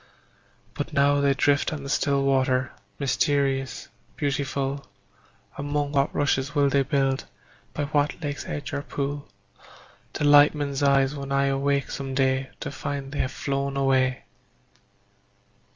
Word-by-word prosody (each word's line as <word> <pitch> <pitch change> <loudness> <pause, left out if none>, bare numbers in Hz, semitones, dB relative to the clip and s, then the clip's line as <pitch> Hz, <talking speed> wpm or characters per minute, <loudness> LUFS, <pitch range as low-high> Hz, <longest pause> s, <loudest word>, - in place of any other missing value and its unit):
But 145 +2 -5
now 145 0 +3
they 140 -1 +3
drift 140 +1 +2
on 150 -3 -5
the - - -6
still 140 -1 +1
water, 130 -1 +2 0.3
Mysterious, 135 0 0 0.3
beautiful; 140 -1 -2 0.7
Among 145 0 -1
what 140 -1 +1
rushes 145 0 0
will 140 -1 +4
they 140 0 +3
build, 135 -1 0 0.5
By 145 - -1
what 145 +2 0
lake's 145 -1 -4
edge 145 -2 -5
or 140 - -1
pool 145 0 -4 0.9
Delight 145 0 +6
men's 140 -1 -2
eyes 135 -1 +3
when 140 -1 -6
I 140 0 +2
awake 140 0 0
some 135 -1 -4
day 130 0 +1
To - - -4
find 140 -1 -5
they 145 - -4
have 130 - 0
flown 140 0 -2
away? 130 -1 +2
140 Hz, 135 wpm, -25 LUFS, 135-145 Hz, 0.9 s, Delight